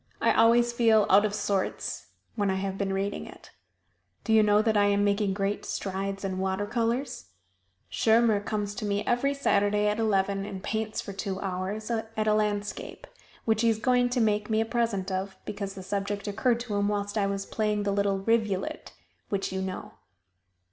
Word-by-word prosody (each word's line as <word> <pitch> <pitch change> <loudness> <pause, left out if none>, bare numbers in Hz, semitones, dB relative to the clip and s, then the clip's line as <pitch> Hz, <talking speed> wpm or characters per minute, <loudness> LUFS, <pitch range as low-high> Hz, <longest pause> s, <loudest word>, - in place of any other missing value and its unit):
I - - +3
always 235 +1 +4
feel 225 -3 +4
out 200 +2 +6
of 210 - -1
sorts 200 -2 -2 0.3
when 205 -3 0
I 190 - +1
have 190 0 -2
been 195 0 -2
reading 195 +1 -2
it. - - -14 0.7
Do 220 - +1
you 220 - +7
know 210 0 +4
that 220 -1 +1
I 205 -1 +4
am 205 0 +2
making 200 -1 +1
great 200 0 -1
strides 195 0 -3
in 185 -1 -2
water 190 +1 -1
colors? 235 +5 -2 0.6
Schirmer 225 -1 +3
comes 205 0 -3
to 215 +1 -5
me 205 0 -1
every 275 +4 +1
Saturday 205 -5 +2
at 210 +1 0
eleven, 195 -2 +1
and 195 -1 -7
paints 220 0 -2
for 200 - -7
two 195 -1 -4
hours 195 +4 -3
at 220 -1 -2
a 215 - +4
landscape, 210 -1 -2 0.4
which 220 -1 +2
he 230 - +4
is 225 - +1
going 245 +1 +2
to 245 +1 0
make 210 -1 +1
me 220 0 +2
a 225 - +2
present 225 -5 -1
of, 190 +1 -3
because 200 -1 -5
the 190 - -8
subject 200 +1 -3
occurred 230 +4 +1
to 230 -4 -4
him 200 0 +1
whilst 205 0 -2
I 200 -2 +1
was 195 0 -3
playing 210 -1 -1
the 200 - 0
little 200 -1 +1
"Rivulet" 215 -4 -1 0.4
(which 195 -1 -2
you 190 - -2
know). 190 -1 -5
205 Hz, 190 wpm, -27 LUFS, 195-220 Hz, 0.7 s, you